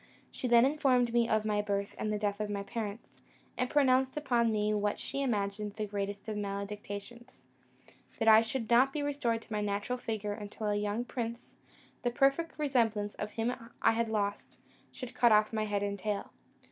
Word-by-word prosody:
She 255 - -3
then 235 0 +6
informed 260 -4 +2
me 235 -1 +3
of 215 0 +2
my 210 -1 +1
birth 200 -1 -2
and 215 - -2
the 210 - 0
death 205 -1 -1
of 210 -1 -2
my 200 -1 -2
parents, 210 +1 -6 0.4
and 250 - -1
pronounced 265 -1 +3
upon 240 -6 +2
me 210 0 +1
what 205 0 0
she 275 - -4
imagined 205 -4 -1
the 215 0 -3
greatest 200 0 -4
of 215 - -3
maledictions; 205 +4 -6 0.7
that 225 - -1
I 220 0 +9
should 225 +1 -3
not 250 +4 +5
be 290 +1 -2
restored 245 -6 -1
to 225 - -9
my 210 - 0
natural 205 +5 -2
figure 215 -3 -3
until 210 0 -5
a 205 - +1
young 210 +3 -1
prince, 235 -2 -5 0.5
the 245 - +1
perfect 275 +7 +1
resemblance 225 -8 +1
of - - -5
him 230 +2 0 0.3
I - - +4
had 230 0 0
lost, 205 -2 -2 0.3
should 255 -2 -8
cut 240 -2 +4
off 215 +1 +4
my 215 -1 0
head 205 -1 -1
and 200 0 -2
tail. 205 0 -3
220 Hz, 190 wpm, -31 LUFS, 205-245 Hz, 0.7 s, I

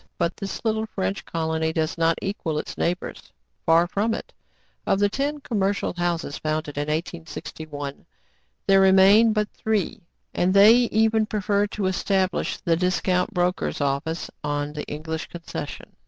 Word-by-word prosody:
But 170 - 0
this 200 +3 -6
little 220 0 0
French 95 - -3
colony 160 -1 -1
does 160 0 -1
not 165 0 +2
equal 180 -6 -2
its - - -4
neighbors: 180 +1 -3 0.4
far 165 +1 +5
from 210 +5 0
it. - - -8 0.5
Of - - +3
the 205 +1 +3
ten 285 +6 -2
commercial 200 -5 -1
houses 175 -4 -2
founded 155 -1 -2
in 145 +1 -2
1861, 155 -3 -5 0.6
there 195 0 +5
remain 195 +4 +6
but 210 -1 0
three; 220 -4 -1 0.3
and 185 +2 +1
they 205 +3 +9 0.2
even 220 0 +2
preferred 205 -1 0
to 205 - -2
establish 190 0 0
the 165 - +1
discount 180 +2 +1
broker's 180 +1 0
office 145 +4 -2
on 145 0 -2
the 150 - -5
English 160 +2 -5
concession. 165 -4 -7
180 Hz, 145 wpm, -24 LUFS, 160-205 Hz, 0.6 s, they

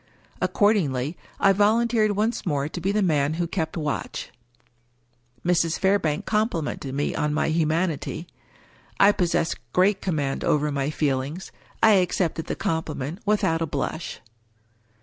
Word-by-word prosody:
Accordingly, 160 - +1 0.2
I 195 - +5
volunteered 215 +1 +3
once 220 +4 0
more 145 -4 -1
to 175 +3 -6
be 190 +3 +1
the 210 0 +1
man 150 -3 +1
who 170 +1 -1
kept 165 -1 -3
watch. 150 -3 -3 1.1
Mrs. 170 -2 +2
Fairbank 190 -6 +1
complimented 170 - -1
me 145 - -1
on 150 0 -1
my 155 - +1
humanity. 160 0 0 0.7
I 200 - +7
pos 180 -4 0
sess 165 - +1 0.2
great 190 +2 +3
command 145 -7 -1
over 150 0 +1
my 140 0 -1
feelings. 145 +3 -2 0.3
I 220 - +8
accepted 170 -2 -1
the - - -2
compliment 160 0 -3
without 165 -6 +2
a 165 - 0
blush. 145 +3 -4
165 Hz, 135 wpm, -24 LUFS, 150-195 Hz, 1.1 s, I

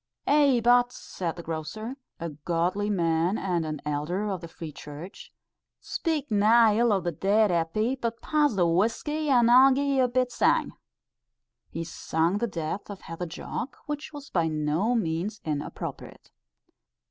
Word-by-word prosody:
"Ay, 285 -3 +4
but," 245 +1 +5
said 170 -3 -5
the 170 - -8
grocer, 165 - -5 0.2
a 170 - -3
godly 170 +7 -1
man 170 0 +1
and 175 -4 -1
an 155 -1 -4
elder 150 +8 -2
of 185 -3 -4
the 170 - -7
Free 165 -1 -8
Church, 150 +7 -10 0.5
"speak 305 -6 -2
nae 215 +1 +5
ill 235 -1 +4
o' 200 - +3
the 175 -1 -2
dead, 200 +5 +2
Eppie, 195 +10 0
but 230 -2 -3
pass 295 -6 +1
the 180 -3 +3
whuskey, 230 - 0
and 240 -3 +5
I'll 260 +2 +8
gie 275 +2 +1
ye 280 -1 +1
a 255 - +4
bit 250 0 0
sang." - - +2 1.0
He 165 - -4
sung 165 +3 -1
the 235 - 0
death 170 +1 -4
of 200 -2 -8
Heather 165 +2 -6
Jock, 240 - -6
which 295 0 -5
was 290 -2 -10
by 170 -3 +1
no 155 +9 0
means 200 +1 -2
inappropriate. 150 -2 -6
200 Hz, 160 wpm, -27 LUFS, 165-245 Hz, 1.0 s, I'll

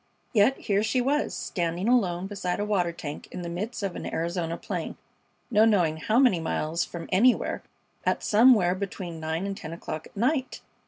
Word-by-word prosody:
Yet 225 +4 +4
here 200 -2 0
she 220 +4 +1
was, 280 +4 +1
standing 175 +2 -2
alone 190 -8 +2
beside 190 -2 -3
a 205 - 0
water 185 -5 +1
tank 150 -3 -7
in 180 - -6
the 170 - -4
midst 205 +7 -4
of 195 -3 -2
an - - -5
Arizona 170 0 -2
plain, - - -5 0.5
no 215 -1 +5
knowing 180 -8 +3
how 215 +8 0
many 250 -9 +5
miles 160 +1 -1
from 170 -1 -7
anywhere, 235 +7 +3 0.4
at - - 0
somewhere 210 -5 +5
between 185 -3 -5
nine 160 +3 -2
and 200 0 -3
ten 165 -3 -7
o'clock 160 -2 -6
at - - -20
night! 260 +4 0
190 Hz, 180 wpm, -27 LUFS, 170-220 Hz, 0.5 s, no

